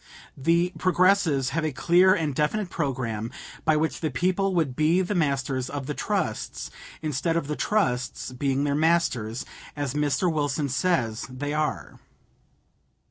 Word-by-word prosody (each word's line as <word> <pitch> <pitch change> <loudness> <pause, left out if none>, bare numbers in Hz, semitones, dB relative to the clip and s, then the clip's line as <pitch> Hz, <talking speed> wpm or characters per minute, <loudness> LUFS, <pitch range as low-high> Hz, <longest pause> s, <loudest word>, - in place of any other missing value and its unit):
The 170 +5 +2
Progressives 185 -7 +3
have 160 +3 -1
a 155 - 0
clear 180 +7 +4
and 155 -6 -1
definite 175 +8 0
programme 120 -7 -2 0.4
by 155 -1 +4
which 160 +1 -1
the 160 - -1
people 185 +7 0
would 150 -7 +1
be 160 +5 +3
the 185 - -2
masters 135 -6 0
of 145 -2 -4
the 150 - -3
trusts - - -3 0.3
instead 155 +2 0
of 165 - -1
the 150 +1 -3
trusts 130 -13 -1
being 135 +2 0
their 145 -1 +1
masters, 145 -8 +1 0.3
as 145 -3 -2
Mr. 150 +4 +1
Wilson 145 -1 0
says 125 -7 0
they 145 +3 -4
are. 130 - -2
150 Hz, 145 wpm, -26 LUFS, 135-170 Hz, 0.4 s, clear